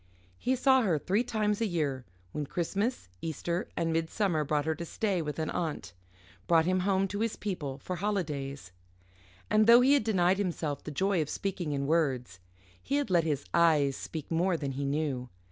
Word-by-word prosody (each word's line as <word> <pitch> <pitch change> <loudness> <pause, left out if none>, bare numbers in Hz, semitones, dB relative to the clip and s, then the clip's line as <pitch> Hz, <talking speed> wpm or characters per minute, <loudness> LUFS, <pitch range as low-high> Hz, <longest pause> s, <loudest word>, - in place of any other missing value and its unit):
He 260 - +1
saw 265 0 +4
her 185 -9 +2
three 195 - +1
times 215 -3 0
a 225 - +2
year, 145 -8 -2 0.3
when 150 -2 -4
Christmas, 200 - -2
Easter, 170 +2 -3
and 165 -1 0
Midsummer 165 0 0
brought 150 0 0
her 160 - +1
to 165 +2 -6
stay 190 +1 -1
with 150 -2 -4
an 160 -1 -2
aunt, 155 - -3 0.5
brought 165 -2 +4
him 185 +1 +2
home 195 +1 +2
to 205 - -4
his 225 0 0
people 155 -10 -4
for 180 +6 -5
holidays. 150 - -3 0.8
And 215 0 +3
though 235 +1 +9
he 265 +3 +5
had 285 - +3
denied 190 -3 +2
himself 165 -7 -2
the - - -6
joy 190 +4 +1
of 150 - -3
speaking 185 -5 -3
in 140 -1 -1
words, 135 - 0 0.4
he 280 - -2
had 285 -8 0
let 170 -2 +4
his 145 -3 -1
eyes 150 -5 +4
speak 155 -1 -7
more 170 +2 +2
than 140 -3 -3
he 140 +1 -3
knew. 140 -3 -1
170 Hz, 190 wpm, -30 LUFS, 150-200 Hz, 0.8 s, though